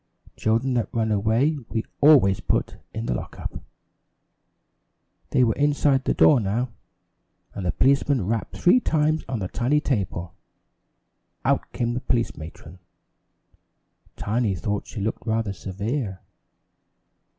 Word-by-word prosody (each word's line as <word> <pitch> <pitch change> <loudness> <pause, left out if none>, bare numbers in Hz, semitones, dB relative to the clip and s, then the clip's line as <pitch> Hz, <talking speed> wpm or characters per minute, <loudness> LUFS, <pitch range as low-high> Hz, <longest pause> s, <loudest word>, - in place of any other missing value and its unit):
Children 115 +4 +1
that 120 -2 -1
run 110 -1 0
away 115 +9 +2
we 115 -1 -1 0.2
always 135 -11 +6
put - - -1
in 110 +1 -4
the - - 0
lock - - -6
up." - - -5 1.7
They 130 - +3
were 115 -2 +3
inside 145 -2 +2
the - - +1
door 145 - +6
now, 115 +4 -1 0.8
and 95 -3 -4
the - - +2
policeman 135 -4 +2
rapped 110 0 -2
three 185 +8 +5
times 155 -6 +1
on 130 - -1
the 95 -4 -3
tiny 125 +9 +1
table. 95 - -2 1.1
Out - - +1
came 120 -1 -1
the 125 - -3
police 120 -2 0
matron. 80 +2 -11 1.4
Tiny 110 -2 0
thought 105 +3 -3
she 110 - -7
looked 110 +3 -3
rather 110 -2 0
severe. 100 +2 -4
115 Hz, 130 wpm, -24 LUFS, 100-135 Hz, 1.7 s, always